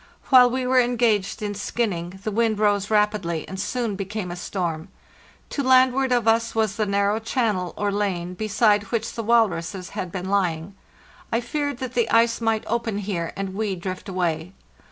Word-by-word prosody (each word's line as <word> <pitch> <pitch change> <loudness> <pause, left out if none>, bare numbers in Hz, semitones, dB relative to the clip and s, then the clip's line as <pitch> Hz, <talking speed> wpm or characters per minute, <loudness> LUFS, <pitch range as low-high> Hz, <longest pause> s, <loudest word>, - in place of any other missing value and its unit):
While 250 -2 +8
we 255 +1 -2
were 255 0 +4
engaged 235 -4 +1
in 205 -1 -2
skinning, 190 -4 -3
the 215 - -2
wind 225 0 +1
rose 205 -1 +1
rapidly, 210 -6 0
and 190 - -7
soon 230 0 -2
became 195 -1 -4
a - - -5
storm. 175 -3 -3 0.6
To 285 - -1
landward 260 0 +4
of 240 -2 +2
us 230 +1 +2
was 220 -3 +1
the 215 -1 -1
narrow 200 +2 +1
channel 220 -6 -1
or 205 0 0
lane 185 -4 -2
beside 210 +1 +2
which 225 +3 -2
the 230 - -4
walruses 195 -5 +1
had 185 - -5
been 185 +1 -5
lying. 185 -2 0 0.6
I 230 - +2
feared 285 +3 -3
that 255 -1 -5
the 235 -2 +1
ice 230 0 +3
might 225 -1 +1
open 230 -2 -1
here, 190 -5 -3
and 195 -1 -3
we 205 -1 -1
drift 185 +2 -6
away. 175 -1 -2
210 Hz, 175 wpm, -23 LUFS, 190-230 Hz, 0.6 s, While